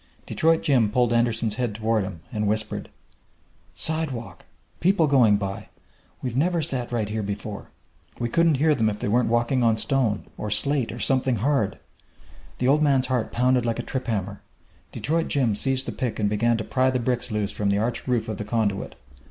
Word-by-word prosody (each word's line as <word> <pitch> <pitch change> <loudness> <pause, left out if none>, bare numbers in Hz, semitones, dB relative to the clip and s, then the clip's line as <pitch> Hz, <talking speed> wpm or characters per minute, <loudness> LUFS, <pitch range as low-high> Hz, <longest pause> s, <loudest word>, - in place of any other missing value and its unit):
Detroit 165 0 +1
Jim 125 -7 +3
pulled 120 +1 +1
Andersen's 115 -2 0
head 120 -5 -2
toward 110 -1 0
him, 95 -4 -7
and 105 -1 -1
whispered: 110 +1 -2 0.9
"Sidewalk! 155 -7 +1 0.3
People 185 -1 +3
going 125 -8 +4
by! 100 -1 -5 0.5
We've 125 -3 -3
never 170 +5 +1
sat 130 -6 -2
right 115 -3 -1
here 110 +1 -3
before! 100 +1 -6 0.5
We 120 - -2
wouldn't 165 +4 +2
hear 155 +3 +3
them 110 -6 +1
if 105 - -4
they - - -3
weren't 120 +3 +2
walking 120 +3 +1
on 115 -2 +3
stone, 120 -5 0
or 105 - -3
slate, 140 +2 +2
or 120 - -8
something 130 -1 +2
hard!" 115 -3 0 0.8
The 125 - 0
old 145 +3 +4
man's 135 -3 +3
heart 125 -3 -1
pounded 125 0 +2
like 115 -1 -1
a 120 - -3
trip 130 -1 -4
hammer. 100 -3 -3 0.5
Detroit 165 +2 -1
Jim 130 -7 +1
seized 130 +5 0
the - - -3
pick 125 -3 -3
and 105 - +1
began 115 +3 +1
to 110 - -3
pry 130 +3 +1
the 130 - 0
bricks 125 0 -1
loose 105 -2 -2
from 100 0 -1
the 100 - +2
arched 115 +4 -2
roof 120 -3 0
of 110 -3 -4
the 105 - -4
conduit. 105 -2 -2
120 Hz, 195 wpm, -24 LUFS, 105-130 Hz, 0.9 s, going